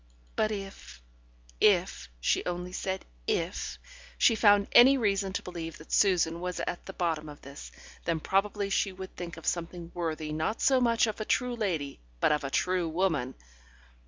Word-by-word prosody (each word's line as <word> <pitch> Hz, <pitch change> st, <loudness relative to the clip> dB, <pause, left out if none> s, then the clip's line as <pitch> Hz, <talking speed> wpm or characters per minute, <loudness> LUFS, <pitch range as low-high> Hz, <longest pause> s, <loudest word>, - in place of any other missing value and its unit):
But 215 Hz, -, +1 dB
if 195 Hz, -, -7 dB, 0.6 s
if -, -, +2 dB
(she -, -, +1 dB
only 180 Hz, 0 st, -3 dB
said 190 Hz, +1 st, -3 dB, 0.2 s
"if") 170 Hz, +3 st, -2 dB, 0.4 s
she 235 Hz, -, +5 dB
found 205 Hz, -2 st, +5 dB
any 265 Hz, +3 st, +8 dB
reason 200 Hz, -4 st, 0 dB
to -, -, -3 dB
believe 165 Hz, -3 st, -6 dB
that 155 Hz, -, -14 dB
Susan 170 Hz, -4 st, +3 dB
was 180 Hz, 0 st, -3 dB
at 175 Hz, -, -4 dB
the 195 Hz, -, -6 dB
bottom 160 Hz, -4 st, -2 dB
of 145 Hz, -, -12 dB
this, 140 Hz, +2 st, -10 dB, 0.3 s
then 165 Hz, -1 st, 0 dB
probably 200 Hz, +3 st, 0 dB
she 195 Hz, -, +1 dB
would 190 Hz, 0 st, -9 dB
think 170 Hz, -1 st, -7 dB
of 165 Hz, -, -11 dB
something 170 Hz, 0 st, -3 dB
worthy 160 Hz, -3 st, -3 dB
not 160 Hz, +9 st, -1 dB
so 265 Hz, -2 st, +4 dB
much 235 Hz, -1 st, +3 dB
of 220 Hz, -1 st, -4 dB
a -, -, 0 dB
true 250 Hz, +1 st, 0 dB
lady 170 Hz, -11 st, -2 dB, 0.2 s
but -, -, +3 dB
of 150 Hz, -1 st, +1 dB
a 135 Hz, -, -2 dB
true 180 Hz, +3 st, 0 dB
woman. 160 Hz, -7 st, 0 dB
180 Hz, 175 wpm, -29 LUFS, 165-200 Hz, 0.6 s, any